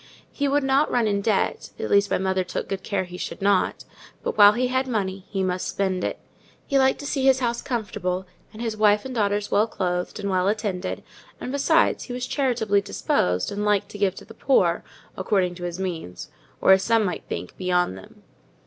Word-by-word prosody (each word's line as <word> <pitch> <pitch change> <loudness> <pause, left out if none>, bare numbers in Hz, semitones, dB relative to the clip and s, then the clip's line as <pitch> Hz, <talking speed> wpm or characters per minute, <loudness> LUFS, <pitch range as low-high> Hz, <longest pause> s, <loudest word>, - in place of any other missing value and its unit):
He 285 - -1
would 285 +1 +2
not 270 +3 +3
run 240 -2 +2
in 200 -1 +1
debt 205 -1 0
(at - - -4
least, 200 0 +4
my - - +2
mother 190 0 0
took 180 - -4
good 195 -1 -3
care 195 -1 -1
he 180 0 -9
should - - -5
not), 195 -1 +1 0.4
but - - -2
while 205 0 +8
he 250 +3 0
had 260 +1 0
money 195 -5 -3
he 195 -2 -1
must 185 0 -1
spend 190 -2 -1
it: - - -2 0.5
he 275 -2 +2
liked 265 0 +3
to - - -7
see 280 -2 -1
his 265 -1 +5
house 235 -2 -1
comfortable, 190 -7 -3 0.3
and 225 +2 -7
his 225 -2 -2
wife 210 0 +3
and 260 - -5
daughters 205 -2 0
well 210 +2 +3
clothed, 180 -2 -2
and 200 - -3
well 185 0 +1
attended; 205 -3 -2 0.4
and 255 - -5
besides, 280 0 +2
he 245 - -6
was 250 0 -3
charitably 235 -8 +1
disposed, 90 - 0
and 205 +1 -3
liked 205 -1 +1
to 205 - -9
give 195 -2 +1
to - - -11
the - - -13
poor, 175 -11 +2 0.3
according 190 -2 0
to 175 0 -7
his 175 +1 -5
means: 170 - -5 0.3
or, - - +5
as 190 0 +6
some 225 +1 +2
might 180 - -3
think, - - -5
beyond 180 - 0
them. 95 - -14
200 Hz, 210 wpm, -24 LUFS, 185-235 Hz, 0.5 s, while